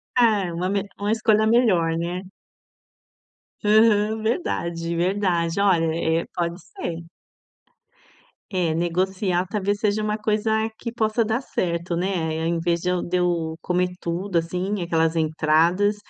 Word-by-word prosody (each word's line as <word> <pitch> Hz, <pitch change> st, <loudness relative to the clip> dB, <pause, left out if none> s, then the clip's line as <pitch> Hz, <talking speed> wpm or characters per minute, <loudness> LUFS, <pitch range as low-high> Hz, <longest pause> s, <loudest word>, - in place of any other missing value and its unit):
Ah, 220 Hz, -5 st, +4 dB
é 170 Hz, -, -5 dB
uma 180 Hz, +2 st, -2 dB
me 200 Hz, 0 st, -1 dB
uma 205 Hz, +1 st, 0 dB
escolha 220 Hz, -1 st, +3 dB
melhor, 190 Hz, -9 st, +3 dB
né? 175 Hz, +2 st, -3 dB, 1.4 s
Aham, 215 Hz, 0 st, +3 dB
verdade, 170 Hz, -, -2 dB
verdade, 175 Hz, -1 st, 0 dB
olha 180 Hz, -5 st, +3 dB, 0.4 s
é, -, -, -8 dB
pode 170 Hz, +1 st, -2 dB
ser. 170 Hz, -3 st, -6 dB, 1.4 s
É, 180 Hz, -5 st, 0 dB
negociar 180 Hz, +2 st, 0 dB
talvez 205 Hz, 0 st, -1 dB
seja 215 Hz, 0 st, 0 dB
uma 210 Hz, 0 st, -1 dB
coisa 220 Hz, +1 st, 0 dB
que 235 Hz, -, -5 dB
possa 225 Hz, 0 st, +1 dB
dar 225 Hz, +3 st, -1 dB
certo, 170 Hz, -7 st, -2 dB
né? 170 Hz, -3 st, -1 dB
Ao 165 Hz, -, -1 dB
invés 170 Hz, 0 st, 0 dB
de 180 Hz, -, -1 dB
eu 180 Hz, -1 st, 0 dB
de 180 Hz, -, -3 dB
eu 170 Hz, -3 st, 0 dB
comer 180 Hz, 0 st, 0 dB
tudo, 175 Hz, +2 st, -2 dB
assim, 180 Hz, +4 st, -2 dB
aquelas 165 Hz, -1 st, +1 dB
entradas, 160 Hz, +5 st, +2 dB
180 Hz, 140 wpm, -23 LUFS, 170-210 Hz, 1.4 s, Ah